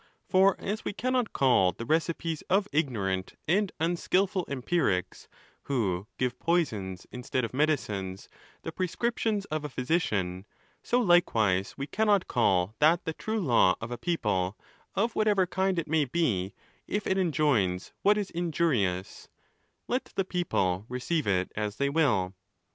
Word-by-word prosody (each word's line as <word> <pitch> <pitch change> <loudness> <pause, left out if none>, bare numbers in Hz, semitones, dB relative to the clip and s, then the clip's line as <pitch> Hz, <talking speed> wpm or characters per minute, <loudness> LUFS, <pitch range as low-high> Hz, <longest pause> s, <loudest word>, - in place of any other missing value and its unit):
For 190 0 +4
as 210 +2 -3
we - - -3
cannot 250 +1 0
call 120 -9 +3
the 115 - -7
recipes 160 +2 -1
of 195 +2 +3
ignorant 100 - -1
and 195 +4 +2
unskilful 180 +3 +1
empirics, 130 - -1 0.4
who 100 -8 -1
give 125 -1 -1
poisons 105 - -1
instead 125 0 -2
of 115 - -8
medicines, 105 -10 -1 0.4
the 165 - -4
prescriptions 210 +3 -1
of 155 -1 -2
a 150 - -4
physician, 105 - -1 0.3
so 245 - +1
likewise 110 - +3
we 140 - -3
cannot 205 +3 +2
call 95 -4 +2
that 160 +3 +4
the 160 - -2
true 220 +6 -3
law 120 - +4
of 115 +2 -6
a - - -2
people, 105 - -1 0.4
of 225 +4 0
whatever 205 -3 +3
kind 190 +1 0
it 165 - -1
may 155 -1 +2
be, 115 - -1 0.3
if 205 0 -2
it 190 - +1
enjoins 140 - +1
what 205 +1 +4
is 205 -2 -3
in 170 0 -2
jurious, 100 - 0 0.6
let 250 +2 -1
the 195 - 0
people 100 - 0
receive 130 +4 -1
it 95 -2 +1
as 105 -1 -2
they 140 +3 0
will. 125 - +2
150 Hz, 150 wpm, -28 LUFS, -, 0.6 s, For